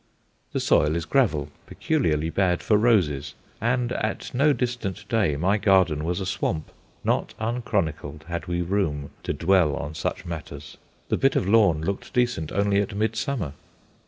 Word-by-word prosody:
The -, -, -1 dB
soil 75 Hz, +2 st, +3 dB
is 85 Hz, -2 st, -2 dB
gravel, 85 Hz, -, +1 dB, 0.2 s
peculiarly 80 Hz, -, 0 dB
bad 90 Hz, -2 st, +1 dB
for 105 Hz, -, +3 dB
roses; 95 Hz, -, +2 dB, 0.3 s
and 120 Hz, +1 st, +1 dB
at 110 Hz, -3 st, -3 dB
no 140 Hz, +4 st, +4 dB
distant 120 Hz, -, -3 dB
day 110 Hz, -, +2 dB
my 95 Hz, +8 st, +1 dB
garden 95 Hz, -7 st, +3 dB
was 85 Hz, +3 st, -1 dB
a 95 Hz, -, -3 dB
swamp, 80 Hz, -4 st, -2 dB, 0.3 s
not -, -, 0 dB
unchronicled 95 Hz, -10 st, -2 dB
had 85 Hz, +2 st, -5 dB
we 85 Hz, 0 st, -1 dB
room 80 Hz, -7 st, -1 dB
to -, -, -3 dB
dwell 85 Hz, -4 st, +3 dB
on 75 Hz, +2 st, -5 dB
such 80 Hz, -, -3 dB
matters. 75 Hz, -4 st, -7 dB, 0.3 s
The -, -, +1 dB
bit 135 Hz, 0 st, +2 dB
of 95 Hz, -, +1 dB
lawn 100 Hz, -7 st, +4 dB
looked 100 Hz, +3 st, -4 dB
decent 120 Hz, -11 st, +1 dB
only 100 Hz, 0 st, +2 dB
at 100 Hz, -1 st, -4 dB
midsummer. 110 Hz, -, -1 dB
95 Hz, 160 wpm, -25 LUFS, 80-110 Hz, 0.3 s, no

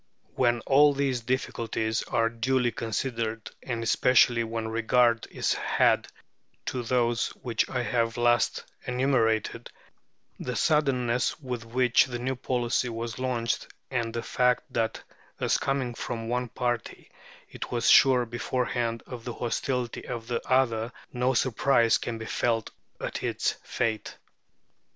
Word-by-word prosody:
When 120 Hz, -2 st, +2 dB
all 145 Hz, +3 st, +5 dB
these 135 Hz, -3 st, 0 dB
difficulties 115 Hz, -2 st, -1 dB
are 115 Hz, -1 st, +1 dB
duly 120 Hz, +2 st, +1 dB
considered, 115 Hz, 0 st, -3 dB
and 115 Hz, -2 st, -3 dB
especially 120 Hz, 0 st, +4 dB
when 115 Hz, 0 st, -3 dB
regard 115 Hz, +1 st, +2 dB
is -, -, 0 dB
had -, -, +2 dB, 0.6 s
to 125 Hz, -, -2 dB
those 120 Hz, -1 st, +1 dB, 0.2 s
which 120 Hz, -3 st, 0 dB
I 125 Hz, -2 st, -1 dB
have 115 Hz, -2 st, 0 dB
last 120 Hz, 0 st, +2 dB, 0.2 s
enumerated, 125 Hz, -4 st, +1 dB, 0.7 s
the 125 Hz, -, -4 dB
suddenness 130 Hz, -6 st, +1 dB
with 125 Hz, -5 st, -5 dB
which 125 Hz, +1 st, +3 dB
the 125 Hz, -2 st, -5 dB
new 130 Hz, +2 st, -2 dB
policy 125 Hz, 0 st, 0 dB
was 115 Hz, +1 st, -5 dB
launched, 120 Hz, -3 st, -1 dB, 0.2 s
and 120 Hz, -3 st, -1 dB
the 115 Hz, 0 st, -4 dB
fact 125 Hz, 0 st, +1 dB
that 115 Hz, -1 st, -1 dB, 0.4 s
as -, -, +2 dB
coming 135 Hz, -3 st, -1 dB
from 115 Hz, -1 st, -5 dB
one 125 Hz, +1 st, -1 dB
party 120 Hz, -1 st, -3 dB, 0.4 s
it -, -, -6 dB
was 120 Hz, -1 st, 0 dB
sure 130 Hz, -2 st, +6 dB
beforehand 120 Hz, -1 st, -2 dB
of 125 Hz, -3 st, -8 dB
the 120 Hz, -, -5 dB
hostility 125 Hz, 0 st, -2 dB
of 120 Hz, -2 st, -5 dB
the 120 Hz, 0 st, -2 dB
other, 120 Hz, -3 st, +2 dB, 0.2 s
no 125 Hz, +1 st, +1 dB
surprise 120 Hz, -1 st, +3 dB
can 115 Hz, -, -4 dB
be 110 Hz, -, -7 dB
felt 115 Hz, -1 st, 0 dB, 0.3 s
at -, -, -4 dB
its -, -, 0 dB
fate. 110 Hz, -3 st, -2 dB
120 Hz, 135 wpm, -27 LUFS, 115-125 Hz, 0.7 s, sure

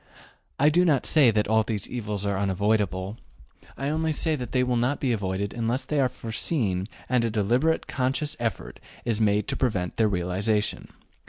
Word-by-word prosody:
I 145 Hz, +2 st, +5 dB
do 175 Hz, +4 st, +3 dB
not 150 Hz, -7 st, +2 dB
say 145 Hz, -6 st, +5 dB
that 105 Hz, -1 st, +1 dB
all 110 Hz, +1 st, +4 dB
these 110 Hz, -2 st, -3 dB
evils 105 Hz, -4 st, -4 dB
are 100 Hz, -1 st, 0 dB
unavoidable; 100 Hz, 0 st, 0 dB, 0.6 s
I 135 Hz, -, -4 dB
say 145 Hz, -, 0 dB
only 160 Hz, +1 st, 0 dB
that 150 Hz, -6 st, 0 dB
they 125 Hz, -1 st, +2 dB
will 125 Hz, -1 st, 0 dB
not 125 Hz, +4 st, +1 dB
be 130 Hz, -, 0 dB
avoided 100 Hz, -2 st, -2 dB
unless 120 Hz, +3 st, -1 dB
they 150 Hz, -, -1 dB
are 130 Hz, -2 st, +3 dB
foreseen 110 Hz, -, -2 dB, 0.2 s
and 125 Hz, -2 st, +2 dB
a 115 Hz, -, +1 dB
deliberate 120 Hz, +10 st, +1 dB
conscious 135 Hz, +4 st, -1 dB
effort 115 Hz, -2 st, -3 dB, 0.3 s
is 115 Hz, -2 st, 0 dB
made 105 Hz, -1 st, +2 dB
to -, -, 0 dB
prevent 100 Hz, -9 st, -1 dB
their 110 Hz, -2 st, +3 dB
realization. 100 Hz, +3 st, -1 dB
115 Hz, 180 wpm, -26 LUFS, 100-130 Hz, 0.6 s, I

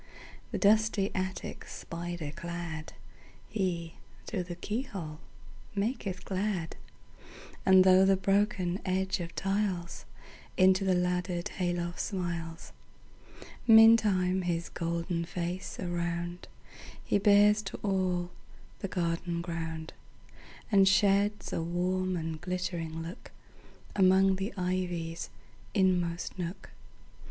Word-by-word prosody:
The -, -, -3 dB
dusty 215 Hz, -1 st, +3 dB
attic 185 Hz, 0 st, -4 dB
spider 170 Hz, -3 st, -6 dB
cladHe, 170 Hz, +2 st, -5 dB, 0.3 s
through 185 Hz, -5 st, -2 dB
the 175 Hz, -1 st, -6 dB
keyhole, 190 Hz, -, -5 dB, 0.6 s
maketh 200 Hz, -2 st, -2 dB
glad; 190 Hz, -3 st, -2 dB, 0.9 s
And 190 Hz, -1 st, +8 dB
through 185 Hz, 0 st, +6 dB
the 195 Hz, 0 st, +4 dB
broken 195 Hz, -2 st, +1 dB
edge 190 Hz, +1 st, 0 dB
of 170 Hz, -1 st, -6 dB
tiles, 195 Hz, -3 st, -2 dB, 0.5 s
Into 190 Hz, +1 st, +5 dB
the 190 Hz, -1 st, +3 dB
laddered 180 Hz, 0 st, -1 dB
hay 180 Hz, -1 st, -1 dB
loft 175 Hz, 0 st, -3 dB
smiles. 170 Hz, -4 st, -4 dB, 0.9 s
Meantime 215 Hz, -5 st, +6 dB
his 170 Hz, -1 st, -2 dB
golden 170 Hz, 0 st, -2 dB
face 175 Hz, +2 st, -4 dB
aroundHe 175 Hz, 0 st, -3 dB, 0.7 s
bears 210 Hz, +1 st, +6 dB
to 195 Hz, -, -6 dB
all 185 Hz, -3 st, 0 dB, 0.5 s
the 195 Hz, -, -3 dB
garden 170 Hz, -1 st, -2 dB
ground, 165 Hz, -2 st, -5 dB, 0.8 s
And 195 Hz, -2 st, +6 dB
sheds 200 Hz, +2 st, +3 dB
a -, -, 0 dB
warm 180 Hz, +2 st, -1 dB
and 160 Hz, -1 st, -4 dB
glittering 175 Hz, -3 st, -3 dB, 0.9 s
lookAmong 190 Hz, 0 st, +5 dB
the 195 Hz, +3 st, -3 dB
ivy's 180 Hz, -2 st, -2 dB, 0.5 s
inmost 180 Hz, -3 st, +1 dB
nook. 180 Hz, +2 st, -5 dB
180 Hz, 100 wpm, -30 LUFS, 170-195 Hz, 0.9 s, And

